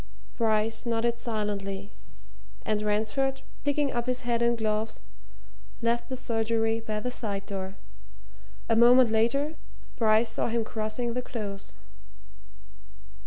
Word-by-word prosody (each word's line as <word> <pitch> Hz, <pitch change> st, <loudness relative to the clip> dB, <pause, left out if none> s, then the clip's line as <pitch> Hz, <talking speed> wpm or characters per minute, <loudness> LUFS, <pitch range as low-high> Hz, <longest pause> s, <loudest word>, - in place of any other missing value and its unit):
Bryce 220 Hz, +1 st, +1 dB
nodded 235 Hz, 0 st, +1 dB
silently, 200 Hz, -3 st, -3 dB, 0.7 s
and 215 Hz, -1 st, +1 dB
Ransford, 220 Hz, +6 st, 0 dB, 0.2 s
picking 285 Hz, -1 st, +1 dB
up 240 Hz, +1 st, -2 dB
his 255 Hz, 0 st, 0 dB
hat 235 Hz, -1 st, 0 dB
and 235 Hz, 0 st, +3 dB
gloves, 215 Hz, -, -1 dB, 0.8 s
left 235 Hz, +1 st, 0 dB
the 260 Hz, -, -3 dB
surgery 225 Hz, -1 st, +1 dB
by 215 Hz, -1 st, -3 dB
the 250 Hz, +3 st, -3 dB
side 200 Hz, -5 st, -3 dB
door. 190 Hz, -1 st, -5 dB, 0.9 s
A 225 Hz, -, +3 dB
moment 240 Hz, +1 st, +7 dB
later, 275 Hz, +8 st, +2 dB, 0.4 s
Bryce 220 Hz, 0 st, +4 dB
saw -, -, -1 dB
him 230 Hz, 0 st, +1 dB
crossing 220 Hz, +2 st, -3 dB
the 250 Hz, -, -1 dB
Close. 200 Hz, -, -6 dB
225 Hz, 120 wpm, -28 LUFS, 215-240 Hz, 0.9 s, moment